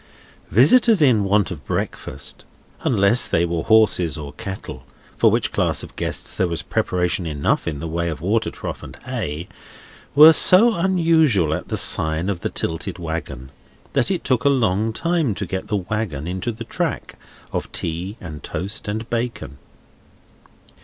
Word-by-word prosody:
Visitors 215 - +5
in 125 -9 +4
want 100 0 +1
of 75 -6 -7
breakfast—unless 100 - -1
they 85 +1 +1
were 85 -1 -2
horses 100 -7 +3
or 75 -2 -8
cattle, 95 - -7 0.3
for - - +4
which - - 0
class - - 0
of - - -11
guests - - -4
there 95 - +2
was 85 -1 -4
preparation 90 -1 -1
enough 75 +1 -1
in 75 -4 -3
the 85 - -5
way 85 +1 -2
of 80 -4 -5
water 105 +8 0
trough - - -7
and - - -11
hay—were 90 - +1
so 215 +9 +6
unusual 165 - +2
at - - -4
the - - -2
sign 80 +4 +3
of 95 -4 -2
The - - -2
Tilted 85 +3 -4
Wagon, 80 -6 -6 0.4
that 135 -3 +1
it 190 -3 -2
took 125 -3 0
a 140 - +4
long 110 -5 +1
time 160 - 0
to 100 - -4
get 95 +1 -5
the 105 - 0
wagon 95 -7 -3
into 95 +6 -3
the 115 +1 -8
track - - -3 0.4
of - - -3
tea 90 +6 -4
and 80 -4 -9
toast 100 +4 -5
and 110 +2 -3
bacon. 115 - -4
100 Hz, 160 wpm, -21 LUFS, 85-120 Hz, 0.4 s, so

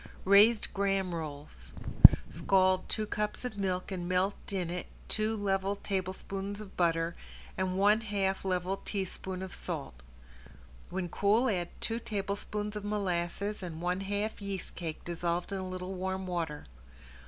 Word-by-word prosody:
~RAISED 205 +3 +6
GRAHAM 195 -2 +1
ROLLS~ 145 - -7 0.5
Scald 185 -1 +2
two 215 - 0
cups 210 +3 -2
of 245 -4 -4
milk 190 -1 -1
and 175 -2 -3
melt 185 +2 +2 0.2
in 180 -4 -1
it 180 0 -4 0.2
two 215 +1 0
level 195 -1 +1
tablespoons 195 +1 -3
of 210 -2 -10
butter 165 -1 +2 0.4
and 185 0 -1
one 205 +3 +5
half 195 -3 0
level 185 0 0
teaspoon 190 -1 -3
of 190 - -6
salt. - - -5 0.9
When 180 0 -2
cool 210 +8 +3
add 175 -3 -1
two 225 0 -1
tablespoons 210 0 -3
of 210 - -4
molasses 200 0 -1
and 170 -3 -5
one 180 +2 0
half 205 +2 -2
yeast 200 -2 -4
cake 160 -3 -5
dissolved 175 +1 -1
in 195 - -2
a 185 -1 -4
little 185 +1 -4
warm 190 0 -2
water. 165 -5 -3
190 Hz, 145 wpm, -31 LUFS, 180-205 Hz, 0.9 s, ~RAISED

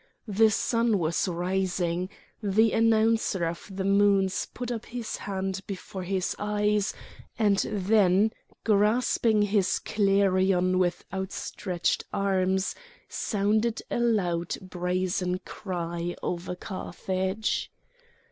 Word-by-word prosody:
The 220 +2 +4
sun 230 +1 +1
was 170 +2 0
rising; 180 0 -1 0.3
the 215 +2 +3
Announcer 225 -4 +2
of 165 +4 -5
the 190 0 -3
Moons 195 -1 +3
put 245 -1 -5
up 230 -2 -4
his 240 -2 -4
hand 190 -1 -3
before 190 -1 -6
his 185 0 -1
eyes, 210 0 +1 0.4
and 205 -3 +3
then 205 0 +3 0.3
grasping 215 +1 +3
his 200 -2 +2
clarion 190 -2 +2
with 175 -1 0
outstretched 190 -1 -2
arms 190 -1 +1 0.3
sounded 215 +2 0
a - - 0
loud 180 -8 +1
brazen 180 0 -1
cry 175 -3 -4
over 180 0 -3
Carthage. 190 +2 -3
195 Hz, 100 wpm, -27 LUFS, 185-210 Hz, 0.4 s, The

